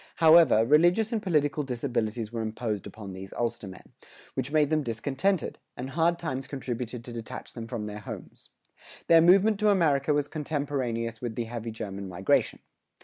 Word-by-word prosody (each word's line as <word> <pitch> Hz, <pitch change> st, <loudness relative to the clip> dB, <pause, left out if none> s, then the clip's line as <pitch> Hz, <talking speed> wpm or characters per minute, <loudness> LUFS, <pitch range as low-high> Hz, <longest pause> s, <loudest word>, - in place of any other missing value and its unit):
However, 160 Hz, -8 st, +6 dB
religious 175 Hz, -, +4 dB
and 220 Hz, -, 0 dB
political 150 Hz, -6 st, +1 dB
disabilities 120 Hz, -4 st, -2 dB
were 115 Hz, -, -2 dB
imposed 110 Hz, -2 st, -3 dB
upon 100 Hz, -1 st, -9 dB
these 95 Hz, +1 st, -9 dB
Ulstermen, 105 Hz, -5 st, -5 dB, 0.4 s
which 130 Hz, +1 st, -3 dB
made 150 Hz, -1 st, +3 dB
them 155 Hz, -1 st, +2 dB
discontented, 140 Hz, -, -1 dB, 0.2 s
and 130 Hz, +2 st, -5 dB
hard 170 Hz, +4 st, +2 dB
times 135 Hz, -6 st, -4 dB
contributed 125 Hz, -3 st, -5 dB
to 120 Hz, -, -8 dB
detach 115 Hz, -1 st, -7 dB
them 115 Hz, -2 st, -7 dB
from 115 Hz, -3 st, -4 dB
their 105 Hz, 0 st, -6 dB
homes. 105 Hz, -, -9 dB, 0.6 s
Their 165 Hz, -1 st, +6 dB
movement 195 Hz, +5 st, +5 dB
to 215 Hz, -1 st, +3 dB
America 155 Hz, -7 st, +3 dB
was 145 Hz, -1 st, +1 dB
contemporaneous 135 Hz, -7 st, -3 dB
with 120 Hz, -3 st, -4 dB
the 120 Hz, -, -1 dB
heavy 115 Hz, 0 st, -5 dB
German 100 Hz, -3 st, -6 dB
migration. 90 Hz, +2 st, +1 dB
130 Hz, 160 wpm, -28 LUFS, 115-155 Hz, 0.6 s, However